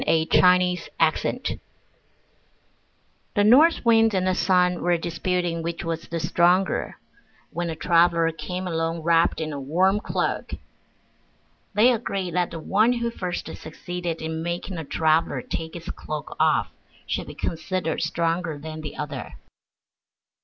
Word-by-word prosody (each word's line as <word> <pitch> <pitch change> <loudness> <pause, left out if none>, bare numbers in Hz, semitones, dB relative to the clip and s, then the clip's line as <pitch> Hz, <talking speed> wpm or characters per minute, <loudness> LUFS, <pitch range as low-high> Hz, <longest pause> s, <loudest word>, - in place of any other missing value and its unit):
Orthographic 180 +2 +3
version - - 0 1.7
The 205 - +4
North 270 +8 +5
Wind 225 -2 +4
and 185 -1 +1
the 185 - +2
Sun 180 -1 +2
were 175 -1 +2
disputing 170 0 -2
which 170 +1 -4
was 165 0 -4
the 170 - -3
stronger, 175 +3 +1 0.5
when 175 0 -3
a 160 - -3
traveler 170 0 +3
came 180 +3 -5
along 165 -1 -2
wrapped 165 0 +3
in 155 -1 -3
a 140 - -4
warm 185 +9 +2
cloak. - - -2 1.2
They 235 +4 +6
agreed 195 -6 -3
that 180 0 +1
the 165 - -7
one 215 +9 +2
who 235 -1 -2
first 180 -5 -4
succeeded 170 +1 -5
in 160 0 -3
making 175 +2 -4
the 160 - -5
traveler 160 +2 +1
take 160 +1 -5
his 170 -1 -6
cloak 155 -2 -6
off - - +2 0.3
should - - -3
be - - -9
considered 165 0 -2
stronger 165 0 -1
than 155 +2 -7
the 150 -2 -7
other. 145 -4 -6
170 Hz, 140 wpm, -24 LUFS, 165-185 Hz, 1.7 s, They